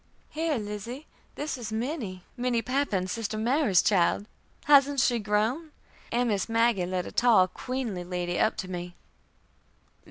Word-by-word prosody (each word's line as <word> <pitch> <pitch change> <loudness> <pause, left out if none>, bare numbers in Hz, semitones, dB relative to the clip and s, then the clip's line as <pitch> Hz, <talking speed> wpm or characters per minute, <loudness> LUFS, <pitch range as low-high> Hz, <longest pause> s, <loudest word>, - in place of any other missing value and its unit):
"Here, 315 -2 -1
Lizzie, 215 +6 -6 0.3
this 295 -3 -4
is 220 -3 -6
Minnie, 220 - -4
Minnie 245 -2 0
Pappan, 255 -8 0
sister 215 +2 -3
Mary's 235 - +3
child. 195 0 +2 0.4
Hasn't 285 -1 +5
she 245 -2 +3
grown?" 220 +10 0 0.4
and 240 0 +1
Miss 205 0 -1
Maggie 225 -5 +2
led 180 -1 -2
a - - -7
tall, 230 -6 +5
queenly 235 -3 -4
lady 175 0 -3
up 220 - +2
to 185 - -4
me. 175 -1 -6
225 Hz, 145 wpm, -27 LUFS, 190-255 Hz, 0.4 s, Hasn't